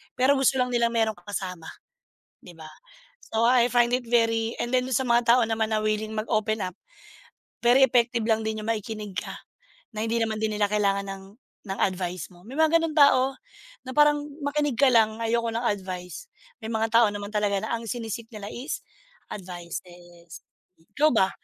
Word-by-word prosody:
pero 260 +3 +4
gusto 265 0 +3
lang 250 - 0
nilang 235 -1 +1
meron 220 -1 +2
kang 175 - -21
kasama 180 -4 -5 0.8
'di 180 - -12
ba. 155 -1 -10 0.6
So, 225 - +1
I 245 -1 +5
find 240 -1 +4
it 250 - -7
very 230 -1 +1
and 240 - -2
then 250 0 +3
dun 260 - -5
sa 265 - +2
mga 235 0 +4
tao - - +3
naman 220 0 -1
na 215 - +1
willing 215 0 -1
mag 215 +1 -3
open 215 -1 0
up, 180 -1 -6 0.9
very 245 +3 +5
effective 235 -1 +1
lang 220 -1 +2
din 220 0 -2
yung - - -7
makikinig 210 -2 -4
ka, - - -4 0.6
na 215 - -3
hindi 230 +1 0
naman 220 -1 -2
din 215 -1 0
nila 205 - +3
kailangan 200 -1 0
ng 195 0 -7 0.4
ng 195 0 -5
advice 180 -3 -2
mo. 175 - -18
May 270 +5 -8
mga 320 +1 +5
ganong 320 -1 -3
tao 270 -2 +5 0.5
na - - -5
parang, 295 0 +4 0.2
"Makinig 290 -2 0
ka 280 - +5
lang, 220 -2 +3
ayoko 230 0 0
ng 235 - -1
advice." 185 - -4 0.4
May - - -5
mga 220 0 -1
tao 235 - +6
naman 205 0 -6
talaga 205 -1 +1
na 220 - -3
ang 230 - -9
sini-seek 230 0 -5
nila 205 -1 -7
is 265 +5 -5 0.5
advices. 175 -2 -9 0.4
Ikaw 300 - +1
ba, 190 -3 +3
220 Hz, 190 wpm, -25 LUFS, 200-240 Hz, 0.9 s, tao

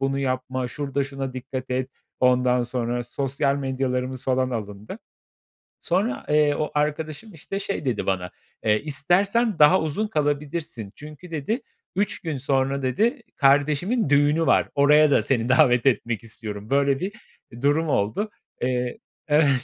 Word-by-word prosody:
bunu 135 0 0
yapma, 130 -1 -2
şurada 140 0 -2
şuna 135 -1 -5
dikkat 130 0 -6
et 130 +1 -1 0.3
ondan 125 -1 +3
sonra 120 0 -2
sosyal 140 +2 -1
medyalarımız 130 -1 -2
falan 130 0 +1
alındı. 105 - -6 0.8
Sonra, 220 +11 -1
eee, 150 -1 +3
o 155 - -2
arkadaşım 155 +7 -2
işte 185 +5 -5
şey 200 -7 -4
dedi 120 -5 -1
bana: 90 -2 -1 0.3
"Eee, 105 0 +2
istersen 180 - +1
daha 155 +5 +6
uzun 160 +8 -1
kalabilirsin." 145 - -2
çünkü 155 +4 -11
dedi, 165 - -2 0.3
"3 200 0 0
gün 160 -5 -4
sonra," 135 0 0
dedi, 225 - +1
"kardeşimin 145 - +2
düğünü 145 +3 +3
var. - - +3
Oraya 150 +1 +5
da - - +4
seni 120 -2 0
davet 130 -2 +4
etmek 120 -3 +1
istiyorum." 105 -1 -7
Böyle 140 0 +2
bir 195 +3 -3 0.5
durum 145 +4 +2
oldu. 135 - 0 0.3
Eee, 125 -1 -1 0.3
evet. 150 -1 +4
140 Hz, 140 wpm, -24 LUFS, 125-155 Hz, 0.8 s, daha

